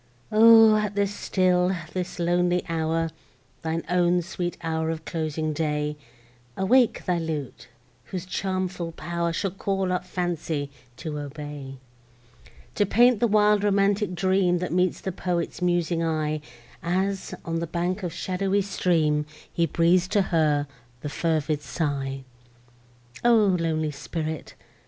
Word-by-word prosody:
O! 225 0 +8
at 210 -1 -1
this 200 0 +1
still, 185 -2 +2 0.2
this 185 -1 -4
lonely 175 +1 +1
hour, 165 0 0 0.5
Thine 165 +1 -2
own 175 0 +2
sweet 175 0 -4
hour 160 -1 -1
of 160 -1 -4
closing 155 -1 -2
day, 150 -1 -1 0.6
Awake 240 +5 +3
thy 180 -2 +1
lute, 155 -5 -5 0.4
whose 185 -2 -5
charmful 185 -2 -3
pow'r 170 +1 -2
Shall 190 +3 -1
call 195 0 -1
up 180 - -1
Fancy 165 -5 -3 0.3
to 150 -2 -5
obey: 145 -1 -7 1.0
To - - +2
paint 240 +2 +5
the 235 - +3
wild 210 -1 +4
romantic 200 -1 +2
dream, 185 -1 +2
That 180 -1 -3
meets 180 0 +1
the 190 - -3
poet's 175 -1 -3
musing 175 -1 +1
eye, 155 -2 -1 0.4
As, 190 +3 -1
on 165 0 -1
the 170 - -3
bank 175 +4 -2
of 180 -3 -3
shadowy 190 +3 0
stream, 155 -6 +1 0.3
He 170 -1 +1
breathes 170 +3 +3
to 200 +1 +2
her 150 -3 +3 0.4
the 145 - -4
fervid 155 -1 0
sigh. 135 -4 -3 1.0
O 240 0 +6 0.2
lonely 160 -2 0
spirit! 155 +2 -5
175 Hz, 135 wpm, -25 LUFS, 160-190 Hz, 1.0 s, O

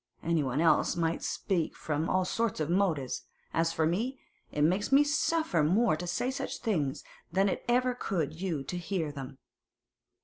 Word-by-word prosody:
Anyone 150 -5 +1
else 165 +1 +3
might 165 -1 0
speak 175 -5 -1
from 155 +1 -2
all 185 0 +2
sorts 230 0 -1
of 155 +1 -1
motives; 170 -9 +1 0.3
as 165 0 +2
for 160 -1 +1
me, 230 +11 -1 0.3
it 150 - 0
makes 185 - +2
me 275 +2 +7
suffer 290 - +1
more 205 +6 +3
to 175 +3 -5
say 245 +8 0
such 265 - -4
things 155 - -1 0.3
than 195 +3 +3
it 195 - -2
ever 250 +1 +3
could 175 - -2
you 165 -8 -1
to 175 +6 -4
hear 165 -3 -2
them. 135 -1 -8
170 Hz, 170 wpm, -30 LUFS, 155-210 Hz, 0.3 s, me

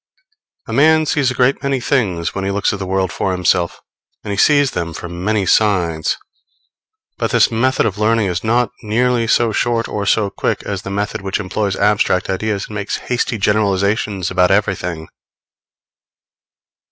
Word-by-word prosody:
A - - -5
man 155 +2 +4
sees 140 -3 +1
a 130 - -3
great 130 +2 +2
many 140 -1 0
things 100 -11 -1
when 95 - -3
he 95 - -1
looks 100 +1 0
at 105 - -5
the 95 - -4
world 95 -2 0
for 95 +4 -2
himself, 90 -1 0 0.4
and 105 - -5
he - - -1
sees 145 +5 +4
them 85 -1 -4
from 85 0 -7
many 105 -1 +1
sides; 90 -6 +1 1.0
but - - 0
this - - +3
method 130 +3 +1
of 105 -2 -2
learning 110 0 +2
is 90 -2 -2
not 120 +2 +1
nearly 120 +2 +1
so 115 0 +2
short 115 +1 0
or 100 -1 -3
so 105 -2 +2
quick - - -2
as 100 -2 -4
the - - -7
method 100 +1 -3
which 95 +1 -2
employs 100 0 -2
abstract 100 -3 +1
ideas 100 +1 -2
and - - -10
makes 100 -1 -3
hasty 120 -1 0
generalizations 100 -1 0
about 90 -1 +3
everything. 90 -5 -1
105 Hz, 170 wpm, -17 LUFS, 95-115 Hz, 1.0 s, man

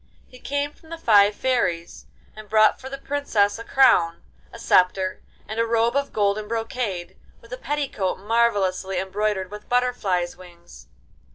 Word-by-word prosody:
He 250 - -16
came 285 +2 -3
from 320 - -21
the 330 - -6
five 210 -8 +4
fairies, 185 -11 -1 0.3
and 215 -1 -12
brought 215 0 +4
for 265 - -8
the 275 - -6
Princess 230 -8 0
a - - -6
crown, 175 -11 +3 0.3
a - - -10
sceptre, 185 +1 +2 0.3
and 220 +1 -5
a 230 - +1
robe 230 +2 +1
of 280 0 -1
golden 210 0 0
brocade, 225 -6 -4 0.2
with 230 +1 -13
a - - -4
petticoat 270 -10 -2
marvellously 200 -3 0
embroidered 190 0 -2
with 210 0 -10
butterflies' 210 -8 0
wings. 175 -2 -15
215 Hz, 155 wpm, -23 LUFS, 190-250 Hz, 0.3 s, five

